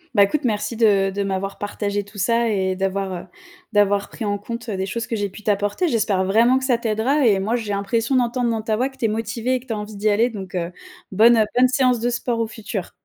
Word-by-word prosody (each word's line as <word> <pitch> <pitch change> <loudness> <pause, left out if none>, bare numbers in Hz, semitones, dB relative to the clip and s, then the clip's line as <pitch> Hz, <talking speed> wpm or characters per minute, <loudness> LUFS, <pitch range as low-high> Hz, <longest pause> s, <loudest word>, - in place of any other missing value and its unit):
Bah 200 - +7
écoute, 275 +10 0
merci 225 -1 -1
de 205 -4 +3
de 200 +1 -2
m'avoir 195 0 -3
partagé 205 0 -3
tout 205 +1 -15
ça 230 +4 +2
et 190 -2 0
d'avoir, 195 0 -2
heu, 175 - -6 0.5
d'avoir 205 -1 +2
pris 230 - -6
en 205 0 0
compte, 230 +3 -7
des 190 -2 -2
choses 230 +5 -4
que 230 - -2
j'ai 205 -2 -2
pu 215 - -12
t'apporter. 205 - 0
J'espère 210 -7 +1
vraiment 230 +7 +4
que 265 - -4
ça 250 -3 +2
t'aidera 235 +5 +1
et 205 -4 +4
moi 215 +5 0
j'ai 220 -4 -3
l'impression 225 +6 0
d'entendre 245 0 +1
dans 225 -1 -1
ta 220 0 -1
voix 255 +5 0
que 265 - -20
tu 235 - -1
es - - +4
motivée 225 +3 -1
et - - -1
que 260 - -20
tu 230 - -2
as - - -3
envie 210 0 -7
d'y 210 +2 +1
aller. 220 +4 +3
Donc, 195 -5 -8
heu, 175 0 -3 0.4
bonne, 230 +4 +6
heu, 220 - +4
bonne 255 +1 +5
séance 250 -2 +2
de 240 - +1
sport 240 -1 -2
au 230 - 0
futur. 210 -4 -6
215 Hz, 260 wpm, -21 LUFS, 200-235 Hz, 0.5 s, Bah